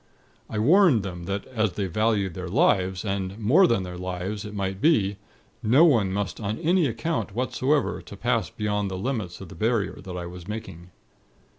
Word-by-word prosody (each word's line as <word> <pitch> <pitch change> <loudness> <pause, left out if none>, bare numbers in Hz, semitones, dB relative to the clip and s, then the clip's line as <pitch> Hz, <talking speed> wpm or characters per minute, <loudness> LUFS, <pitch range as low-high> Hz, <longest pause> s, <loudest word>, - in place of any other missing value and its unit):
I 110 - -4
warned 145 - +5
them 90 -3 -6
that, 100 +2 -3
as 110 -6 -1
they 100 - -2
valued 100 0 0
their 90 +1 -6
lives, 95 +1 +2
and 95 -1 -2
more 130 - +5
than 115 -5 +1
their 90 -1 -7
lives 95 +3 -4
it 105 - -7
might 95 0 -3
be, 105 -12 +3 0.4
no 130 +10 +5
one 115 - +3
must 100 0 -3
on 105 0 -3
any 170 -1 +2
account 135 -4 -3
whatsoever 130 +3 0
pass 115 +1 -2
beyond 105 -1 -2
the 95 - -4
limits 105 -6 -3
of 95 - -9
the - - -10
barrier 110 -2 -1
that 90 -1 -7
I 90 - -4
was 90 0 -9
making. 105 -5 -7
105 Hz, 180 wpm, -25 LUFS, 95-115 Hz, 0.4 s, warned